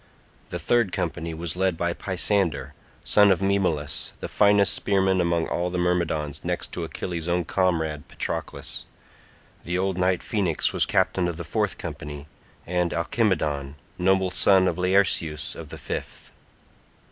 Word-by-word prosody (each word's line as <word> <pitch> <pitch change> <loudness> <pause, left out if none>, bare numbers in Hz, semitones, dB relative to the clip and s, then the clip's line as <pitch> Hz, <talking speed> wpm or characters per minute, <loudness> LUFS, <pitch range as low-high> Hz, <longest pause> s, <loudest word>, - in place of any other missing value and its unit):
The - - -3
third 120 -5 +2
company 80 -1 -3
was 85 +1 -4
led 95 -2 +1
by 85 +1 0
Pisander 85 -7 -1 0.3
son 105 -1 +5
of 95 - +3
Maemalus, 95 -7 0
the - - -4
finest 100 -1 +4
spearman 95 -2 +2
among 85 -1 +1
all 90 +1 -1
the 90 - -3
Myrmidons 85 -4 0
next - - -2
to - - -3
Achilles' 85 -2 -4
own 85 0 +1
comrade 80 -6 0
Patroclus. - - -4 0.8
The 90 +1 -1
old 95 0 0
knight 90 0 +2
Phoenix 100 - 0
was - - +2
captain 90 -2 +2
of 85 -2 -3
the 85 - -5
fourth 80 - -1
company, 75 0 -7 0.4
and 90 0 0
Alcimedon, 80 -7 0 0.2
noble 95 0 +3
son 95 0 +4
of 90 0 -1
Laerceus 90 -5 +1
of - - -9
the - - -8
fifth. - - -6
90 Hz, 145 wpm, -25 LUFS, 80-95 Hz, 0.8 s, son